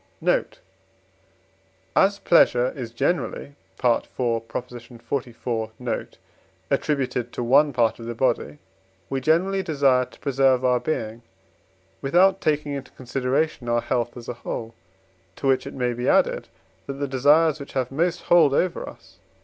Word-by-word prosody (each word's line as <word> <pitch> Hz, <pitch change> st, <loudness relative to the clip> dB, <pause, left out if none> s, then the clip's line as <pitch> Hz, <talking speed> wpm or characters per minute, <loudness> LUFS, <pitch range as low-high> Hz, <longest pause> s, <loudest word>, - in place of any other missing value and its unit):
Note. -, -, 0 dB, 1.4 s
As 200 Hz, +1 st, +4 dB
pleasure 125 Hz, -9 st, +4 dB
is 125 Hz, -4 st, -6 dB
generally 140 Hz, +3 st, -2 dB, 0.2 s
(IV. 120 Hz, -2 st, +1 dB
xliv. 120 Hz, -1 st, -4 dB
note) 125 Hz, -2 st, -4 dB, 0.5 s
attributed 135 Hz, -4 st, -1 dB
to -, -, -4 dB
one 140 Hz, +5 st, +4 dB
part 120 Hz, -3 st, +1 dB
of 115 Hz, -, -8 dB
the 120 Hz, -, -4 dB
body, 115 Hz, -, 0 dB, 0.5 s
we 135 Hz, -1 st, -1 dB
generally 180 Hz, +7 st, +2 dB
desire 140 Hz, -6 st, +2 dB
to -, -, -19 dB
preserve 135 Hz, -2 st, +2 dB
our 125 Hz, -1 st, +3 dB
being 115 Hz, -4 st, -3 dB, 0.8 s
with 135 Hz, +3 st, -4 dB
out 190 Hz, +2 st, +5 dB
taking 150 Hz, -3 st, 0 dB
into 140 Hz, -2 st, -6 dB
consideration 130 Hz, +1 st, -2 dB
our 120 Hz, 0 st, +2 dB
health 120 Hz, -1 st, -2 dB
as 120 Hz, -, -10 dB
a -, -, -3 dB
whole: 115 Hz, -1 st, -6 dB, 0.6 s
to -, -, -7 dB
which 135 Hz, -1 st, +2 dB
it -, -, -7 dB
may 125 Hz, -2 st, 0 dB
be 120 Hz, +2 st, -1 dB
added, -, -, +2 dB, 0.4 s
that 140 Hz, -, -3 dB
the 140 Hz, +1 st, -3 dB
desires 145 Hz, +4 st, +3 dB
which 140 Hz, -, -9 dB
have 130 Hz, -2 st, -1 dB
most 170 Hz, +5 st, 0 dB
hold 160 Hz, -5 st, +5 dB
over 180 Hz, +2 st, 0 dB
us -, -, -17 dB
(IV. -, -, -35 dB
130 Hz, 150 wpm, -24 LUFS, 120-150 Hz, 1.4 s, out